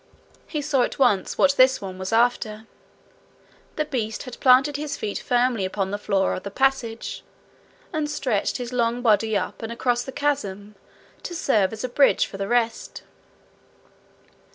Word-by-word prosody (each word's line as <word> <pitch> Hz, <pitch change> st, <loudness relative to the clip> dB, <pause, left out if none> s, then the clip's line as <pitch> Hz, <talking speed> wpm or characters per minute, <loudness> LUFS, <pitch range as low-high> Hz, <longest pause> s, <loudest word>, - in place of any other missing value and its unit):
He 300 Hz, -2 st, -3 dB
saw 280 Hz, -2 st, +1 dB
at -, -, -1 dB
once 240 Hz, -8 st, +2 dB
what 280 Hz, 0 st, +4 dB
this 260 Hz, 0 st, +5 dB
one 190 Hz, -1 st, -7 dB
was 190 Hz, 0 st, -4 dB
after. 225 Hz, -2 st, +1 dB, 1.1 s
The 305 Hz, -, -1 dB
beast 230 Hz, -7 st, -3 dB
had 250 Hz, -, -9 dB
planted 265 Hz, +3 st, +5 dB
his 295 Hz, 0 st, -4 dB
feet 205 Hz, -, -3 dB
firmly 245 Hz, -3 st, +1 dB
upon 190 Hz, 0 st, -2 dB
the 205 Hz, -, -3 dB
floor 195 Hz, -2 st, +1 dB
of -, -, -4 dB
the 200 Hz, -, -6 dB
passage, 235 Hz, -1 st, -1 dB, 0.7 s
and 305 Hz, -2 st, -1 dB
stretched 260 Hz, -8 st, -1 dB
his 245 Hz, -1 st, -6 dB
long 240 Hz, 0 st, 0 dB
body 220 Hz, -1 st, +3 dB
up -, -, -4 dB
and 225 Hz, 0 st, -5 dB
across 240 Hz, +1 st, 0 dB
the 265 Hz, -, -7 dB
chasm 210 Hz, -8 st, -2 dB, 0.5 s
to 350 Hz, -, -6 dB
serve 215 Hz, -, +2 dB
as 220 Hz, +1 st, -7 dB
a -, -, 0 dB
bridge 275 Hz, +3 st, +4 dB
for 195 Hz, -, -9 dB
the 195 Hz, 0 st, -3 dB
rest. 235 Hz, 0 st, -1 dB
240 Hz, 165 wpm, -24 LUFS, 210-265 Hz, 1.1 s, this